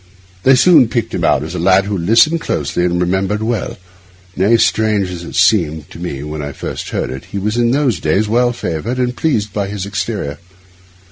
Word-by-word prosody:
They 130 +7 +5
soon 145 -2 +6
picked 115 0 -2
him - - -2
out 70 - +2
as 80 +2 -6
a 90 - -4
lad 95 0 +3
who 100 0 -2
listened 115 - +3
closely 90 - -1
and 90 0 0
remembered 95 +4 0
well; 115 -2 -2 0.6
nay, 105 +6 +3
strange 105 -4 +1
as 85 -1 -7
it - - -9
seemed 85 -5 +2
to - - -10
me 70 -6 -5
when 75 0 -5
I 70 -1 -5
first - - -6
heard - - -3
it, 65 +1 -7
he 100 - -7
was 105 +3 -1
in 120 -1 +2
those 135 -1 +1
days 105 +3 +1
well 120 +3 +2
favoured, 115 +1 -4
and 125 -1 -1
pleased 110 -10 -1
by 100 -2 -2
his 100 -1 -5
exterior. 100 -8 -4
100 Hz, 205 wpm, -16 LUFS, 90-115 Hz, 0.6 s, soon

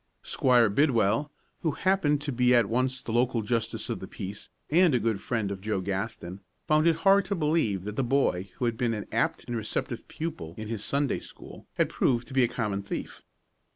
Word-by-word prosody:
Squire 125 -3 +4
Bidwell, 115 +2 +2 0.3
who 160 -4 -1
happened 155 -7 +1
to 145 -1 -3
be 125 0 +3
at 120 -2 +5
once 130 +3 0
the - - -5
local 120 -1 +1
justice 115 +1 -1
of - - -3
the - - -7
peace 100 +2 -7 0.2
and 170 -3 +5
a - - +3
good 110 -2 -1
friend 110 -5 -1
of 95 -1 -5
Joe 105 -1 -1
Gaston, 95 -1 -4 0.2
found 155 +1 +3
it 165 - +4
hard 195 0 +6
to 200 - -1
believe 150 - +1
that 105 +1 -6
the 135 - +2
boy 120 -8 +1
who 125 - -2
had 115 -1 -1
been 115 -2 0
an 105 - -5
apt - - 0
and 120 - -4
receptive 110 -2 -3
pupil 90 - -6
in 110 0 -6
his 110 -2 -4
Sunday 140 0 0
school - - -12
had - - +2
proved 120 -2 0
to - - -9
be 130 - +4
a - - +4
common 105 -5 -2
thief. 100 - -6
120 Hz, 210 wpm, -28 LUFS, 105-140 Hz, 0.3 s, hard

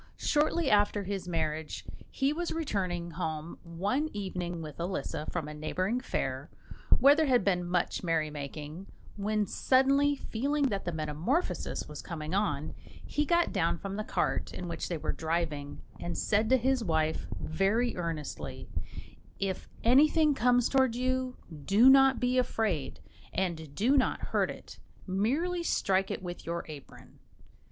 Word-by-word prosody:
Shortly 305 +1 +1
after 205 0 +3
his 195 -1 -4
marriage, 160 -2 -2 0.2
he 275 +1 +1
was 345 +2 -2
returning 185 - -2
home 160 -1 -4
one 200 - -1
evening 180 -4 -4
with 155 -2 -8
Elisa 170 -4 -3
from 165 -4 -3
a 150 - -6
neighbouring 185 +9 -1
fair, 135 - -3 0.5
where 275 +3 +7
there 310 0 +2
had 245 -5 +4
been 180 -3 +2
much 175 0 0
merrymaking, 155 +1 -3 0.3
when, 210 +1 0
suddenly 275 +5 +3
feeling 280 +3 0
that 200 -3 -3
the 175 - -1
metamorphosis 160 - -1
was - - -7
coming 155 -2 -5
on, 155 -8 0 0.3
he 295 - 0
got 345 0 +3
down 170 -4 +1
from 195 +3 -5
the 215 - -2
cart - - -1
in 180 - -6
which 165 -1 -4
they 170 - -1
were - - -2
driving, 160 -3 -2 0.2
and 175 - -4
said 215 +1 +2
to 260 - +6
his 260 0 +1
wife, 160 -4 0
very 210 +8 +1
earnestly, 165 -4 -5 0.7
"If 195 -2 -3
anything 300 +5 +5
comes 245 -1 +3
towards 260 -3 +2
you, 255 0 -1 0.3
do 225 - +7
not 270 0 +6
be 250 +1 +2
afraid, 215 - -1 0.3
and 160 -6 -2
do 245 - +3
not 260 - +2
hurt - - +1
it; - - -9 0.3
merely 275 - 0
strike 195 - +1
it - - -4
with 175 -1 -6
your 170 0 -3
apron." 150 -3 -12
195 Hz, 150 wpm, -30 LUFS, 165-255 Hz, 0.7 s, where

